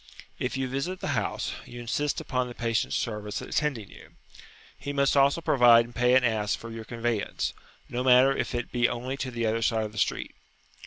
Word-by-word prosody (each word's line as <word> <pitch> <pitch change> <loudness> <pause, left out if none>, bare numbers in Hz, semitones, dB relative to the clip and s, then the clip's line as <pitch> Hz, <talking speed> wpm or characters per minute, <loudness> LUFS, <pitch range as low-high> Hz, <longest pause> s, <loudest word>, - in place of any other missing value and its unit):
If 125 +1 -2
you 135 -1 -1
visit 140 +9 -3
the - - -4
house, - - -1
you 120 - -10
insist 140 +5 -1
upon 125 -2 -2
the 120 - -9
patient's 115 -1 -1
servants 105 -2 -3
attending 130 -10 -2
you; - - -15 0.6
he 145 - -6
must 140 0 +2
also 140 +4 +4
provide 120 -6 +6
and 120 - -14
pay 125 +1 +3
an 130 - +5
ass 110 -3 +1
for 115 - -9
your 115 -1 -7
conveyance, 115 -2 -2 0.3
no 125 +1 -3
matter 130 +1 +6
if - - -2
it 120 0 -3
be 120 -1 +2
only 125 +3 -4
to 130 - -3
the 120 -2 -2
other 110 +1 0
side 115 -1 +1
of 105 - -6
the 105 - -6
street. - - -1
120 Hz, 205 wpm, -27 LUFS, 115-130 Hz, 0.6 s, provide